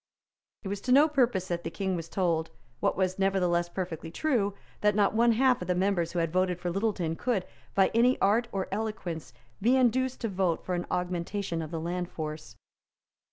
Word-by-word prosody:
It - - -5
was 200 0 -3
to 250 - -2
no 285 +4 +7
purpose 245 - +1
that 170 -1 -2
the 165 - -3
King 190 +2 -2
was 165 -1 -5
told, 165 -4 0 0.3
what - - +1
was 185 0 0
nevertheless 180 -3 +2
perfectly 175 -3 -5
true, 205 - 0 0.2
that 210 -1 +2
not 205 -1 +3
one 235 +1 +4
half 255 0 +3
of 180 - -5
the 180 - +1
members 180 -2 +1
who - - -3
had 165 -1 0
voted 185 -1 +1
for 175 -1 -2
Littleton, 190 -4 -1
could, 210 -2 -1 0.3
by 195 -1 +4
any 245 +3 +4
art 220 +5 +3
or 195 -1 -2
eloquence, 190 - -4 0.3
be 240 +6 +4
induced 260 +1 +2
to 230 - 0
vote 185 -4 -1
for 185 - -2
an 175 0 -2
augmentation 180 0 -2
of 155 - -5
the 165 - -4
land 175 +2 -3
force. 155 -6 -6
190 Hz, 200 wpm, -29 LUFS, 170-220 Hz, 0.3 s, no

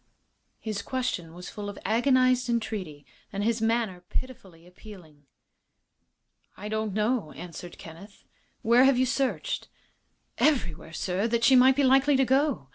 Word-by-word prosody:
His 215 -3 -4
question 200 -10 -3
was 180 0 -9
full 205 -1 -6
of 200 - -9
agonized 255 +2 +2
entreaty, 200 -11 -3 0.3
and 200 +1 -3
his 225 +1 0
manner 225 -5 0
pitifully 190 -10 -7
appealing. 175 -6 -15 1.3
"I 210 +2 -7
don't 215 -1 -2
know," 215 -5 0
answered 175 0 -9
Kenneth. 170 +6 -13 0.4
"Where 235 +4 +5
have 270 -2 +4
you 255 - +3
searched?" 265 +1 -2 0.7
"Everywhere, 175 - 0
sir, 190 +6 -1
that 235 0 -1
she 265 - +6
might 260 +1 +6
be 285 - +2
likely 270 +2 +4
to 265 0 +3
go. 265 - +1
220 Hz, 140 wpm, -27 LUFS, 180-255 Hz, 1.3 s, she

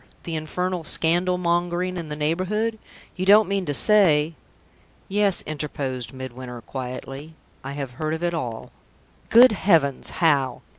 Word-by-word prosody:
the 165 - -4
infernal 180 +3 -3
scandal 175 +3 +1
mongering 175 +1 -1
in 170 -3 -6
the 150 - -4
neighborhood? 185 +9 -1 0.4
You 185 0 -3
don't 210 +1 +7
mean 195 -1 -2
to 145 - -1
say 165 -6 +4 0.4
?" - - -33
"Yes," 200 -1 +2
interposed 140 -5 -4
Midwinter, 130 -2 -8
quietly; 135 +5 -7 0.3
"I 135 +1 -6
have 140 -3 -5
heard 155 +5 -3
of 160 - -7
it 175 0 0
all." 120 -9 -5 0.6
"Good 245 +2 +8
heavens! 165 -10 +1
how? 140 -7 +1
160 Hz, 145 wpm, -23 LUFS, 140-185 Hz, 0.6 s, Good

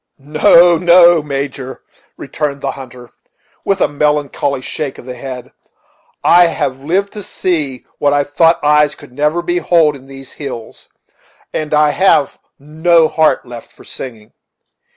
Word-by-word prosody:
"No, 160 +4 +4
no, 175 -1 +5
Major," 140 -2 -6 0.3
returned 145 -2 -4
the 135 - -2
hunter, 125 -3 -12 0.5
with 195 -1 -1
a - - +4
melancholy 145 -2 -1
shake 140 +1 -5
of - - -13
the 125 - -7
head, 125 0 -8 0.7
"I 175 0 +5
have 135 -5 -3
lived 190 +6 -1
to 210 - -7
see 155 -9 -3
what 145 - +2
I 145 0 +2
thought 165 +4 +2
eyes 150 0 +3
could 145 - -16
never 150 +6 -1
behold 170 -3 +1
in 135 -1 -15
these 135 -1 -11
hills, 130 -6 -9 0.6
and 155 -1 -4
I 150 -1 +3
have 180 -6 +1 0.2
no 160 +3 +2
heart 160 -3 +1
left 120 -2 -11
for - - -18
singing. 115 -5 -10
150 Hz, 145 wpm, -15 LUFS, 135-165 Hz, 0.7 s, no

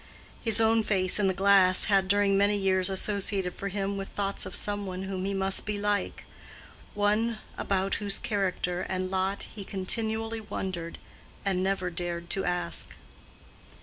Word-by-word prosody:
His 225 -2 +5
own 225 0 +4
face 190 -3 +2
in 200 - +2
the 190 - +1
glass 195 -1 +4
had 195 -2 +2
during 200 0 +3
many 200 +1 +3
years 190 -1 +2
associated 195 -1 0
for 200 - -5
him 200 0 -3
with 195 0 -5
thoughts 200 -1 -3
of - - -6
some 205 -1 -1
one 185 0 -5
whom 190 -1 -4
he 200 - -2
must 195 0 +4
be 210 -1 -3
like—one 205 +1 -3 0.2
about 195 0 -1
whose 200 -1 0
character 185 -3 -2
and 185 0 -3
lot 190 +1 -1
he 210 - -7
continually 220 +3 +1
wondered, 185 -5 -5 0.5
and 190 -2 +1
never 190 -1 -1
dared 170 0 -4
to 195 - 0
ask. 175 -1 -1
195 Hz, 155 wpm, -28 LUFS, 185-205 Hz, 0.5 s, His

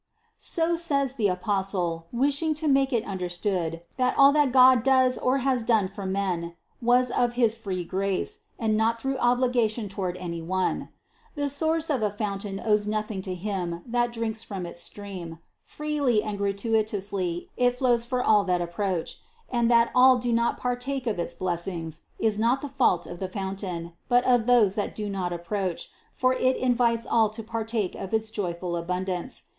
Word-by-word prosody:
So 335 -1 0
says 280 -6 +1
the 225 -6 +1
Apostle, 185 -3 -1
wishing 285 +5 +1
to 310 +1 -2
make 270 -1 +3
it 235 -3 0
under 185 -2 -4
stood, 175 -2 -2
that 255 -1 +1
all 275 0 +8
that 295 -3 +3
God 255 -1 +7
does 260 0 +4
or 255 +2 +1
has 255 -3 +2
done 220 -4 +2
for 195 0 -7
men, 180 -3 -2 0.3
was 245 +1 +3
of 245 -1 +1
his 235 -3 +2
free 195 -6 -4
grace, 190 +2 -2 0.2
and 220 -2 +1
not 225 +1 +1
through 270 +2 -2
obligation 240 -3 +1
toward 190 -2 -3
212 - - -8
CITY 170 -2 -5
OF 165 - -9
GOD 185 - -2
any 185 - 0
one. - - -11 0.5
The 285 -1 -1
source 315 +3 +1
of 265 -5 0
a 210 - +2
fountain 200 -1 -4
owes 210 -1 +2
nothing 215 -2 -2
to 185 -1 -4
him 180 -3 -4
that 240 0 0
drinks 225 -1 -3
from 200 -5 -6
its 170 0 -6
stream; 185 -5 -7 0.2
freely 290 -7 0
and 210 -1 -3
gratuitously 200 -3 -1
it 245 0 +2
flows 245 -2 +2
for 250 +1 -1
all 210 -2 +4
that 180 -1 +1
approach; 175 0 -3 0.3
and 235 -2 +2
that 235 -1 +4
all 255 0 +7
do 240 -1 -1
not 235 0 +1
partake 250 +2 -2
of 215 -6 -1
its 170 0 -3
blessings 170 -2 -3 0.2
is 215 -2 0
not 235 +4 +2
the - - -2
fault 250 -10 +2
of 175 - -8
the 190 - -3
fountain, 190 -3 -5 0.2
but 245 0 +4
of 245 -3 +3
those 235 -6 +5
that 205 0 -3
do 210 -1 -4
not 185 -2 -2
approach, 175 +1 -3 0.2
for 255 0 +1
it 255 0 +1
invites 235 -2 +1
all 225 -2 +3
to 220 +2 -7
partake 225 -3 -2
of 195 +3 -3
its 220 0 -2
joyful 175 -4 -3
abundance. 180 +5 -3
215 Hz, 185 wpm, -26 LUFS, 185-245 Hz, 0.5 s, all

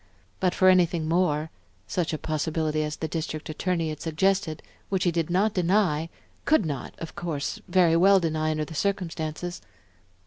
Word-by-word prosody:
But 180 -1 +1
for 185 - +4
anything 175 -3 +4
more, 160 -2 +1 0.3
such 170 +9 -1
a 155 - -2
possibility 155 0 -1
as 150 0 -2
the 160 - -4
District 155 -1 -4
Attorney 165 0 -1
had 155 -1 -6
suggested, 160 -1 0 0.3
which 190 -2 0
he 175 - +3
did 165 -1 -1
not 200 +4 +2
deny, 175 -4 +1 0.3
could 300 - +3
not, 140 -5 -4
of 165 - -8
course, 165 +3 -3
very 175 -2 +4
well 195 +3 +6
deny 155 -2 0
under 155 0 -1
the 160 - -10
circumstances?... 175 -2 -3
165 Hz, 165 wpm, -26 LUFS, 155-185 Hz, 0.3 s, well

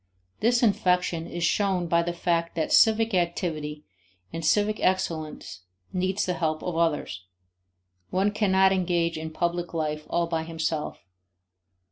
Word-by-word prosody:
This 240 +2 +2
infection 180 -5 +1
is 175 0 -4
shown 190 0 +1
by 170 0 +2
the 170 +1 -2
fact 170 -1 -1
that 160 - -1
civic 225 0 +5
activity 165 -4 -2 0.5
and 165 - -4
civic 210 +6 +2
excellence 160 - -2 0.3
need 185 +1 -1
the 185 - 0
help 155 -3 -2
of 180 - -3
others; 150 - -1 0.8
one 195 +3 +1
cannot 190 -2 +3
engage 175 -3 +1
in 160 0 -5
public 175 +1 -2
life 150 -1 -2
all 170 - +1
by 165 -1 -2
himself. 160 - -3
170 Hz, 135 wpm, -26 LUFS, 160-190 Hz, 0.8 s, civic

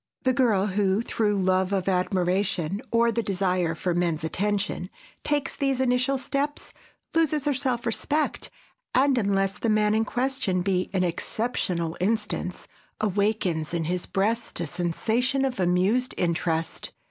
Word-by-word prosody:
The 260 -2 +3
girl 225 -6 +3
who, 200 +1 +1
through 210 -3 0
love 185 0 +2
of 195 -2 0
admiration, 185 0 0
or 235 0 +3
the 230 - 0
desire 185 -4 0
for 180 +1 -1
men's 170 -3 0
attention, 200 +2 -1 0.3
takes 290 -2 0
these 275 -2 0
initial 260 +1 +2
steps, 280 +3 -3 0.4
loses 310 -3 +2
her 290 - +2
self 255 -3 -1
respect, 290 +6 -1 0.5
and, 270 +1 +4
unless 195 -3 +1
the 230 - 0
man 210 -1 +3
in 220 +1 +3
question 240 -7 -1
be 185 -1 0
an 185 -1 +2
exceptional 175 -2 -1
instance, 210 -2 -2 0.3
awakens 200 -6 0
in 165 - 0
his 180 +2 -2
breast 220 +3 -1
a 170 - -1
sensation 220 - 0
of 255 -6 -3
amused 185 +8 +2
interest. 165 -1 -1
200 Hz, 140 wpm, -26 LUFS, 180-245 Hz, 0.5 s, and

